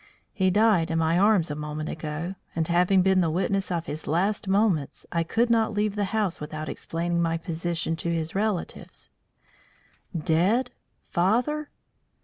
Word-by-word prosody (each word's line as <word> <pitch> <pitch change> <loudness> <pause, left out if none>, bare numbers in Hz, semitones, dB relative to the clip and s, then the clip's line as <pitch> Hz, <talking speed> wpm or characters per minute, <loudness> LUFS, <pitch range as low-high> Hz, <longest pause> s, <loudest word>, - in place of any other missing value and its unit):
He 190 -3 +2
died 205 -4 +3
in 165 - 0
my 165 +1 +2
arms 195 -6 +3
a - - -3
moment 150 +1 -5
ago; 155 +3 -4 0.2
and 160 -1 0
having 180 +2 +3
been 190 0 +4
the 165 - +1
witness 190 +3 0
of 170 -2 -1
his 155 +1 -6
last 195 +6 0
moments, 190 -7 +1
I 170 - +1
could 230 +8 +1
not 225 -1 +2
leave 210 0 0
the 205 -1 0
house 200 -5 -1
without 155 +1 -5
explaining 170 +1 -2
my 165 -1 +1
position 165 0 -2
to 170 - -3
his 165 -1 -2
relatives." 205 -2 -3 1.1
"Dead! 185 - +2 0.3
Father?" 250 +12 0
175 Hz, 155 wpm, -26 LUFS, 165-205 Hz, 1.1 s, been